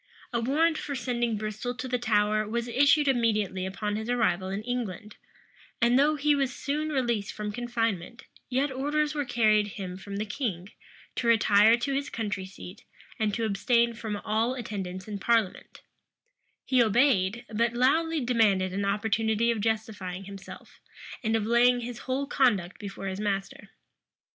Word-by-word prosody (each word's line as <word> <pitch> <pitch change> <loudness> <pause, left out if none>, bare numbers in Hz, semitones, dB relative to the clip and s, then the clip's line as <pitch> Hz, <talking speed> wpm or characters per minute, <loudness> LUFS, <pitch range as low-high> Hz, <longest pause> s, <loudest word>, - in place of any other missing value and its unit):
A 235 - +1
warrant 315 +7 +2
for 285 - -4
sending 240 -3 -1
Bristol 215 +4 -4
to 250 - -5
the 250 0 -1
Tower 215 -2 +1
was 235 +1 -2
issued 285 +4 +4
immediately 215 -7 +1
upon 210 +2 -3
his 220 +2 -5
arrival 205 -6 +1
in 195 +2 -3
England;[*] 220 -4 -4 0.6
and 240 +2 +4
though 300 +2 +4
he 295 0 +2
was 275 -2 +1
soon 295 +4 -2
released 240 -8 -1
from 210 -1 -4
confinement, 230 -2 -2 0.3
yet 265 +2 0
orders 295 +3 0
were 290 -2 -2
carried 215 -4 +3
him 185 -2 -5
from 200 +1 -8
the 210 +2 -2
king, 205 -5 -4 0.5
to 235 - -1
retire 220 0 +5
to 275 +3 -2
his 280 +1 -2
country 205 -4 -3
seat, 190 +1 -11 0.4
and 210 -2 0
to 230 - -1
abstain 235 +3 +2
from 220 -2 -4
all 225 +4 +1
attendance 190 -6 -5
in 205 -2 -5
parliament 225 -2 0 0.8
He 255 -2 +3
obeyed; 230 -1 +2
but 235 +2 +1
loudly 315 +6 +2
demanded 210 -7 +2
an 200 +1 -1
opportunity 220 +3 +1
of 225 -3 -2
justifying 205 -4 -2
himself, 195 0 -11 0.4
and 220 0 +1
of 220 -2 0
laying 245 +2 +4
his 240 0 -6
whole 270 +2 0
conduct 210 -11 +1
before 200 -2 -7
his 190 0 -3
master. 200 0 -3
225 Hz, 160 wpm, -28 LUFS, 205-250 Hz, 0.8 s, retire